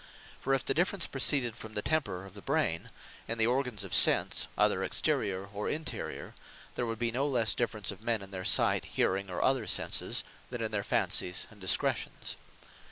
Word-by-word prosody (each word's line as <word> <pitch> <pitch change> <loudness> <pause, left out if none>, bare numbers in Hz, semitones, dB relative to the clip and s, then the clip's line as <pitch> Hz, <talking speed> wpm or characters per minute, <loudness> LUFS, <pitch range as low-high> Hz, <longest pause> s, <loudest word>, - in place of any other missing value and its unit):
For 135 - +1
if 135 - -3
the - - +2
difference 180 +5 +1
proceeded 135 -3 +2
from 110 0 -10
the 105 - 0
temper 105 -13 -1
of 95 - -12
the 100 - -10
brain, 140 - 0 0.4
and 115 0 -3
the 110 - +6
organs 125 -4 0
of 95 - -5
Sense, - - +4
either - - +2
exterior 95 -1 0
or 105 +1 -3
interior, 155 +1 -4 0.4
there 120 - -2
would 115 0 -3
be 115 0 -1
no 135 +5 0
lesse 120 -6 +3
difference 110 -4 -1
of 100 - -11
men 115 -3 -1
in 95 - -11
their 95 -1 -5
Sight, - - +4
Hearing, 95 +1 -1
or 90 - -2
other 130 -4 +1
Senses, - - +1 0.3
than 120 - -5
in 110 - -3
their 105 -1 -1
Fancies, 90 -2 0
and 105 -2 -17
Discretions. 95 -4 0
110 Hz, 190 wpm, -30 LUFS, 100-130 Hz, 0.4 s, the